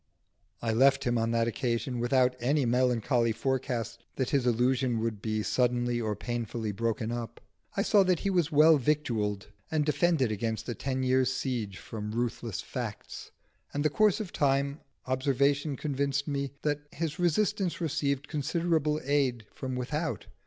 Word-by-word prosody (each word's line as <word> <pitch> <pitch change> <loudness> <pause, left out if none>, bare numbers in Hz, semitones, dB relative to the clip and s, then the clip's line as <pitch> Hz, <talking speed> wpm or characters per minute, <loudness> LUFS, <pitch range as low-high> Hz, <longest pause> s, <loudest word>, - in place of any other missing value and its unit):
I 115 -1 +1
left 135 +4 +4
him 120 -1 +1
on 115 0 0
that 115 0 +1
occasion 120 0 -1
without 125 +1 +3
any 140 +3 +2
melancholy 120 -1 +2
forecast 120 -2 -2
that 130 -2 -1
his 135 -3 +2
illusion 125 0 +2
would 110 -2 -2
be 110 -1 -1
suddenly 120 0 +1
or 110 -2 -1
painfully 115 0 -3
broken 115 +2 -2
up. 115 -1 -5 0.4
I 200 - +3
saw 210 -2 +5
that 180 -3 +2
he 200 - 0
was 175 -4 +1
well 155 +1 +7
victualled 115 -9 -1 0.2
and 155 -2 +1
defended 150 -4 +2
against 110 +1 -2
a 120 - -2
ten 130 +1 -2
years' 130 0 +3
siege 115 -8 -3
from 105 -1 -6
ruthless 115 -3 -2
facts; - - -6 0.5
and 145 - 0
in - - 0
the 150 -1 0
course 215 -1 +4
of 210 -5 -5
time 140 +1 +1 0.3
observation 140 +2 +1
convinced 140 0 -1
me 140 -1 -1
that 150 -1 +1
his 160 0 -3
resistance 185 +2 +1
received 145 -4 -1
considerable 155 0 0
aid 130 -5 +1
from 130 -1 -4
without. 145 +6 -2
130 Hz, 160 wpm, -29 LUFS, 115-145 Hz, 0.5 s, well